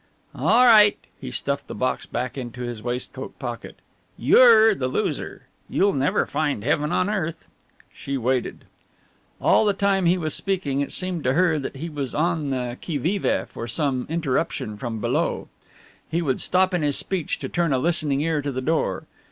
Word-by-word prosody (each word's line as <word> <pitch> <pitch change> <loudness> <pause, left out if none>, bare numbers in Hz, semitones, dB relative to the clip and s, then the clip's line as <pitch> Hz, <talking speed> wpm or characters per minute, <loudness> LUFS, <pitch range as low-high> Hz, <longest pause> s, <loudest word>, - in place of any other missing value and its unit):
"All 245 +3 +4
right" 210 -3 +7 0.2
he - - -7
stuffed 140 - -3
the - - -7
box 130 0 -2
back 125 0 -3
into 125 -2 -6
his 120 -3 -5
waistcoat 125 +3 -5
pocket 120 -3 -6 0.4
"you're 225 - +6
the 130 -10 -2
loser, 130 - -3 0.3
you'll 200 +1 +2
never 135 +1 +1
find 145 -9 -2
heaven 150 +3 0
on 185 - +1
earth!" 180 -6 -3 0.5
She 140 0 -4
waited. 125 0 -2 0.7
All - - +4
the 205 -2 +2
time 195 -2 +2
he 180 +2 +3
was 155 -4 -2
speaking, 165 -8 -1
it 140 - -3
seemed 185 -4 -1
to 130 - +2
her 165 -1 +2
that 135 - -6
he 155 +5 -5
was 145 -5 -4
on 160 -2 0
the 125 -2 -3
qui 160 -4 -2
vive 180 +8 0
for 115 - -6
some 130 0 -1
interruption 155 -8 -2
from 115 +1 -5
below. - - -1 0.6
He 170 +2 -1
would 135 -5 -1
stop 185 +1 +2
in 175 - +1
his 145 -2 +2
speech 185 -5 -2
to - - -5
turn 170 -3 0
a 135 - +2
listening 150 -1 +1
ear 155 -1 0
to 140 0 -3
the 130 - -3
door. 155 +5 -1
150 Hz, 180 wpm, -23 LUFS, 130-175 Hz, 0.7 s, right